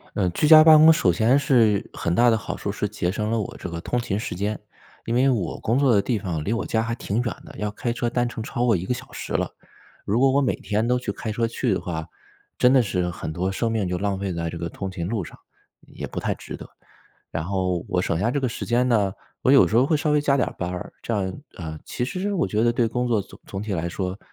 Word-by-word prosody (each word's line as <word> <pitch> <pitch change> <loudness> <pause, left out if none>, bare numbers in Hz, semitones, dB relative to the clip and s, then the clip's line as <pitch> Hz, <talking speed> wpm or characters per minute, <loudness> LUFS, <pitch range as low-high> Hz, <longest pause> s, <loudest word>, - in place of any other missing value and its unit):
呃， 95 -3 +1
居 150 - +1
家 155 0 +10
办 160 -1 +9
公 160 +1 +9
首 140 - +3
先 115 +10 +3
是， 115 -8 +3
很 85 +1 -2
大 120 0 +5
的 115 - +3
好 110 - -5
处 100 - -3
是 105 0 -2
节 90 -3 -2
省 105 +1 -2
了 115 0 +1
我 100 - -5
这 - - -6
个 85 0 -5
通 120 +8 -1
勤 100 -4 -2
时 110 - -4
间。 100 +4 -2 0.5
因 115 - -1
为 130 +3 +4
我 105 -10 -1
工 115 +4 +1
作 135 -4 +4
的 100 - +4
地 120 0 0
方 85 -7 -3
离 105 - -1
我 115 - -1
家 110 - +1
还 115 0 -2
挺 115 0 -2
远 - - -6 0.2
的， - - -12
要 105 0 -2
开 120 +3 -3
车 120 0 -2
单 120 0 0
程 115 - -6
超 120 +2 -1
过 115 -4 +4
1 90 - -4
个 110 - -1
小 125 - -6
时 - - -6
了。 - - 0 0.5
如 105 +4 +1
果 135 0 +5
我 140 +1 +3
每 130 - +1
天 110 +2 -1
都 125 0 +2
去 125 - -4
开 110 - -5
车 115 +2 0
去 115 0 -1
的 95 - 0
话， 80 -3 -5 0.5
真 125 - +5
的 130 -2 +6
是 90 -5 -1
很 85 -2 -5
多 90 +4 -1
生 115 +4 -1
命 105 -5 0
就 90 0 -1
浪 100 0 -1
费 95 -1 -3
在 85 -1 -3
这 85 - -7
个 85 0 -3
通 95 +3 -5
勤 85 -2 -4
路 105 -3 -2
上， - - -12 0.4
也 - - -8
不 - - -6
太 - - -1
值 - - -8
得。 - - -11 0.6
然 80 0 -3
后 90 -1 -1
我 90 -1 0
省 85 -3 0
下 110 +6 +1
这 145 - 0
个 130 - 0
时 115 - -5
间 120 +2 +2
呢， 105 -5 +2 0.3
我 - - +3
有 140 - +7
时 110 - 0
候 125 +3 +5
会 155 - +2
稍 155 0 0
微 150 0 +3
加 140 -1 +2
点 130 - +1
儿 - - -11
班 90 0 -2
儿。 90 - -6
这 115 - -2
样， 95 +1 -2
啊， 80 -3 -6
其 120 - -3
实 185 +9 -3
我 175 - +1
觉 105 +1 0
得 120 - +3
对 120 0 +2
工 125 +2 -1
作 110 -4 +2
总 - - -15
总 95 0 -5
体 105 -1 -4
来 85 -2 -1
说， 90 +2 -4
110 Hz, 300 characters per minute, -24 LUFS, 95-125 Hz, 0.6 s, 家